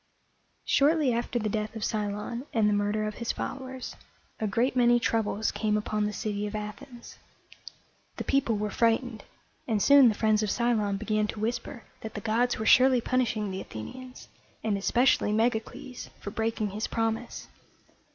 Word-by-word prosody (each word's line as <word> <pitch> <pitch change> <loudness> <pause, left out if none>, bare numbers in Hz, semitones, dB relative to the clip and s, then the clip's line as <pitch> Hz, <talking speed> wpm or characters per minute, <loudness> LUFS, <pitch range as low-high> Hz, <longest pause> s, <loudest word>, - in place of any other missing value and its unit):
Shortly 290 -2 +3
after 240 +1 -1
the 220 -2 -1
death 215 +1 -3
of 220 - -5
Cylon 210 +5 -3
and 220 -2 +4
the 210 - +3
murder 205 +1 0
of 215 - -3
his 235 - 0
followers, 260 -1 -6 0.4
a 220 - 0
great 235 +6 +1
many 240 -1 +5
troubles 220 -2 0
came 210 -1 0
upon 210 0 -1
the - - -3
city 210 -1 -3
of 205 - -6
Athens. 235 +4 -8 1.0
The - - -3
people 255 -5 +1
were 210 0 -2
frightened, 230 +1 +1 0.4
and 220 -3 +1
soon 280 +2 +7
the 215 - -1
friends 215 0 +2
of 215 - -1
Cylon 220 -4 +1
began 215 0 0
to 215 - -6
whisper 235 +3 -3 0.2
that 220 - -8
the - - -3
gods 235 +4 +1
were 220 - -3
surely 255 +2 +6
punishing 230 -4 0
the 190 - -4
Athenians, 255 - -9 0.4
and 215 -2 +1
especially 235 +3 +2
Megacles, 225 +3 -2
for 205 - -6
breaking 220 -1 -1
his 215 +3 -3
promise. 225 +1 -2
220 Hz, 165 wpm, -28 LUFS, 210-245 Hz, 1.0 s, soon